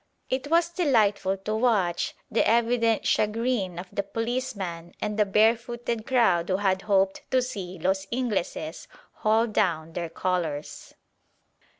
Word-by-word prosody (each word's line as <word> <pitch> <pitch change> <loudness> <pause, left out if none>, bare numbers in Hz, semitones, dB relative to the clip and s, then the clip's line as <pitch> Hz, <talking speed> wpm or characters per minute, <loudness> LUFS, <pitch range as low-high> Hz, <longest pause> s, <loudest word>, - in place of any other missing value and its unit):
It 260 +1 -1
was 335 +1 +3
delightful 215 - +2
to 215 - -1
watch 210 -7 +1 0.2
the 225 - +3
evident 230 -1 +2
chagrin 215 -4 0
of 180 +2 -6
the - - 0
policeman 200 -6 -4
and 210 0 -2
the 210 -1 +2
barefooted 230 +2 +1
crowd 205 -10 +3
who 185 - +2
had 190 -1 +1
hoped 195 -2 +1
to 260 - +3
see 195 -8 -5
"los 190 +3 -1
Ingleses" 210 -10 -2 0.2
haul 220 +2 +2
down 170 -8 0
their 170 -1 -3
colours. 165 -4 -3
210 Hz, 130 wpm, -26 LUFS, 185-235 Hz, 0.2 s, was